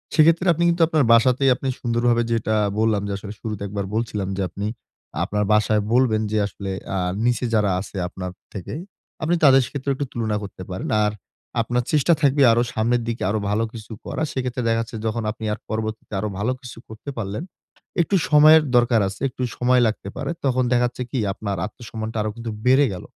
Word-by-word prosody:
সেক্ষেত্রে 165 +3 +5
আপনি 170 +2 -1
কিন্তু 170 0 0
আপনার 155 -3 +2
বাসাতেই 130 +3 +4
আপনি 135 - -5
সুন্দরভাবে 120 0 +1
যেটা 110 -1 +1 0.2
বললাম, 110 -2 +2
যে 100 - -3
আসলে 100 +1 -8
শুরুতে 105 -2 -5
একবার 100 0 -3
বলছিলাম 110 -4 -2
যে, - - -1
আপনি 100 +4 -4 0.6
আপনার 105 0 -1
বাসায় 105 0 +3
বলবেন 120 -4 +3
যে 110 - +1
আসলে 100 0 -6 0.2
অ্যা 95 - -2 0.3
নিচে 120 +1 +1
যারা 105 -2 +3
আছে 100 +1 -7
আপনার 90 0 -6 0.2
থেকে, 95 -4 -6 0.5
আপনি 165 +3 +2
তাদের 135 -2 +7
সাথেও 140 +1 -3
একটু 145 - -2
তুলনা 110 -3 -1
করতে 95 -2 -8
পারেন। 90 0 -4
আর, 105 - +2 0.5
আপনার 120 +2 0
চেষ্টা 155 +2 +4
থাকবে 140 -1 +3
আরো 115 +1 +3
সামনের 120 +2 +1
দিকে 115 0 -3
আরো 110 +2 0
ভালো 105 +2 +1
কিছু 110 -1 -10
করার। 155 - -2
সেক্ষেত্রে 125 -1 -2
দেখা 115 0 +2
যাচ্ছে 115 0 -7
যখন 110 +1 -1
আপনি 110 0 -7
আর 105 - -6
পরবর্তীতে 110 0 -4
আরো 105 +2 -2
ভালো 110 +5 +1
কিছু 125 - -10
করতে 110 +6 -9
পারলেন, 105 +5 -3 0.6
একটু 185 +4 +1
সময়ের 155 +1 +7
দরকার 120 -1 +4
আছে, 100 +3 -8
একটু 125 - -5
সময় 125 0 +3
লাগতে 110 -2 -4
পারে। - - -2
তখন 130 -1 +2
দেখা 125 0 +4
যাচ্ছে 125 - -5
কি 130 - -1
আপনার 100 -2 -4
আত্মসম্মানটা 110 +1 -6
আরো 110 - -1
কিন্তু 115 -1 -5
বেড়ে 130 +3 +5
গেল। 90 - -7
115 Hz, 195 wpm, -22 LUFS, 105-130 Hz, 0.6 s, তাদের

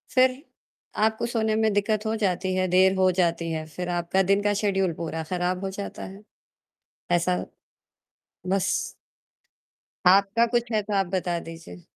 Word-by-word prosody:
फिर, 255 +1 +3 0.5
आपको 220 +2 +1
सोने 220 -2 +1
में 220 - +3
दिक्कत 210 +1 0
हो 220 0 0
जाती 185 0 0
है, 185 0 +1
देर 190 +1 +5
हो 185 - +5
जाती 170 -1 0
है, 160 -1 -3
फिर 180 0 -4
आपका 175 +3 +1
दिन 200 +1 +3
का 205 0 +2
शेड्यूल 195 -3 +1
पूरा 160 -1 -3
खराब 180 +1 -1
हो - - -2
जाता 200 - -6
है। 200 +2 -14 0.9
ऐसा, 180 +1 +1 1.1
बस। 195 0 +1 1.4
आपका 200 +5 +5
कुछ 240 0 -1
है, 215 -1 +2
तो 210 +1 -5
आप 195 -1 +2
बता 175 -2 -1
दीजिए। 165 - -10
190 Hz, 155 wpm, -25 LUFS, 180-215 Hz, 1.4 s, देर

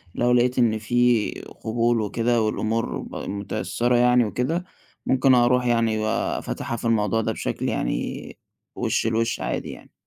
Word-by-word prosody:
لو 120 - +2
لقيت 125 +1 +3
إن 115 -3 +3
في 120 0 +2 0.3
قبول 115 +1 +1
وكده 115 +3 0
والأمور 110 +1 -1
م 100 - -6
مُتأثرِة 120 +4 -1
يعني 125 0 +4
وكده، 130 - -1 0.4
ممكن 130 0 +3
أروُح 125 +1 +3
يعني 115 -2 +2
وأفاتِحها 115 +1 -2
في 115 - -7
الموضوع 115 -1 +2
ده - - -1
بِشَكل - - -3
يعني - - -3 0.4
وِش - - 0
لوِش 115 +1 0
عادي - - -3
يعني. - - -13
120 Hz, 145 wpm, -23 LUFS, 110-125 Hz, 0.4 s, يعني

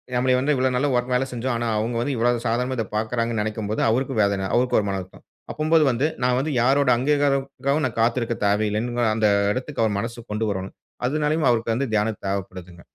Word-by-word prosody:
நம்மளே 125 +1 +2
வந்து 145 +3 +1
இவ்வளோ 130 0 +1
நல்லா 140 +3 +1 0.2
வேல 125 +1 +2
செஞ்சோம். 120 +1 -2
ஆனா 120 - -2
அவுங்க 115 +2 -2
வந்து 135 +2 -1
இவ்வளோ 120 +2 +2
சாதாரணமா, 125 +3 -1
இத 115 - 0
பார்க்குறாங்கன்னு 115 0 -1
நெனைக்கும் 105 -1 -3
போது, 110 - -1
அவருக்கும் 125 -1 0
வேதனை. 100 -1 0
அவருக்கும் 125 0 +3
ஒரு 100 - -4
மனம்வருத்தம். 95 -1 -6 0.3
அப்பம்போது 155 +1 +3
வந்து 130 +5 +1 0.2
நான் 125 0 +2
வந்து 150 +3 -2
யாரோட 135 +2 +3
அங்கீகாரக்காகவும், 140 +1 0
நான் 115 -1 -6
காத்திருக்க 115 0 +1
தேவையில்லன்னு 110 +3 +1
அந்த 110 -1 +2 0.3
எடத்துக்கு, 130 -1 -3
அவர் 105 -2 0
மனசு 115 +1 -6
கொண்டு 110 +1 -1
வரனும். 95 -1 -5 0.3
அதனாலயும் 150 +1 0
அவருக்கு 115 -1 0
வந்து 130 -1 -2
தியானம் 105 0 0
தேவைப்படுதுங்க. 90 -3 -5
120 Hz, 185 wpm, -23 LUFS, 110-130 Hz, 0.3 s, அவருக்கும்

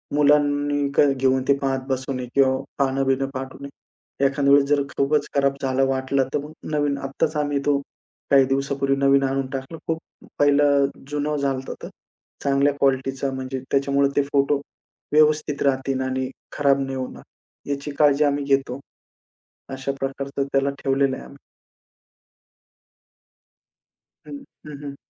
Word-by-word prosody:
मुलांनी 145 -1 +3
काय 140 -1 +5
घेऊन 130 0 +1
ते 140 - +6
पाहत 135 -1 -1
बसू 130 0 -2
नये 125 -1 -4
किंवा 130 -1 +4 0.2
पानं-बीनं 135 -1 +1
फाटू 130 0 -6
नये. 140 - -7 0.6
एखाद्या 140 0 +3
वेळेस 140 0 +6
जर 145 -1 +3 0.2
खूपच 145 +1 +1
खराब 140 0 +2
झालं 135 0 +1
वाटलं, 135 0 0
तर - - +2
मग 150 - -9 0.2
नवीन 145 -1 +1
आत्ताच 140 +3 -2
आम्ही 145 -1 0
तो 145 -1 +3 0.5
काही 135 -1 +6
दिवसापूर्वी 135 +1 0
नवीन 140 0 +4
आणून 135 0 -1
टाकलं. 135 +4 -5
खूप 165 -1 0 0.4
पाहिलं 145 -1 +4 0.3
जुनं 150 +1 -1
झालं 140 -1 0
होतं 135 - -7
तर. - - -6 0.5
चांगल्या 140 0 +2
क्वालिटीचा 135 0 0
म्हणजे 130 0 -4
त्याच्यामुळे 140 0 +2
ते 145 - +4
फोटो 140 0 +2 0.5
व्यवस्थित 150 -1 +3
राहतील, 135 -1 0
आणि 130 0 -2 0.2
खराब 140 -1 +3
नाही 135 -1 -3
होणार 130 -1 -6 0.5
याची 140 +1 -3
काळजी 145 0 +5
आम्ही 145 0 +1
घेतो. 135 -2 0 0.9
अशा 135 +1 -3
प्रकारचं 140 +1 -3
त्याला 135 0 +2
ठेवलेलं 135 0 +2
आहे - - -9
आम्ही. 140 - -14 2.9
हं, 145 - -7 0.3
हं, 150 -1 -8
हं. 140 -1 -6
140 Hz, 145 wpm, -23 LUFS, 135-145 Hz, 2.9 s, ते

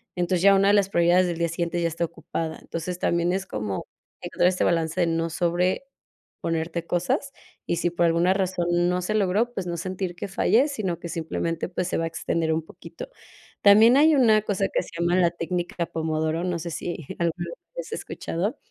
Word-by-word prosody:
entonces 175 0 0
ya 200 0 +7
una 195 +1 +4
de 205 - +5
las 200 -2 +3
prioridades 175 +1 +4
del 170 -2 -3
día 170 - +1
siguiente 170 +1 -2
ya 170 - +2
está 165 +1 -1
ocupada. 165 0 -5
Entonces 170 +2 -5
también 170 +1 +1
es 190 0 -2
como 105 - -4 0.4
encontrar - - +1
este 185 - -1
balance 165 +1 +1
de 170 - +3
no 165 0 0
sobreponerte 170 -2 -3
cosas, 260 - -1 0.3
y 170 - -1
si 175 - +1
por 175 0 +1
alguna 170 +2 +3
razón 185 -2 -1 0.2
no 180 0 0
se 195 +4 -2
logró, 215 +4 +1
pues, 190 -5 -4
no 170 - -3
sentir 185 +1 -4
que - - -5
falles, 250 +8 +3
sino 185 - -2
que 170 - -7
simplemente, 165 0 -3
pues, 180 0 -2
se - - -1
va 165 - 0
a - - -1
extender 165 0 -1
un 160 - 0
poquito. - - -10 0.5
También 220 +5 +7
hay 310 +1 +6
una 220 -5 +5
cosa 200 -2 0
que - - +2
se - - -12
llama 175 +1 +2
la 170 -2 +4
técnica 175 0 -3
Pomodoro, 160 +1 -1
no 180 -2 -1
sé 170 - -5
si 170 -1 -5
alguna 170 - +2 0.2
vez - - -9 0.2
lo - - -2
has - - -12
escuchado, 195 - -3
175 Hz, 205 wpm, -25 LUFS, 165-190 Hz, 0.5 s, ya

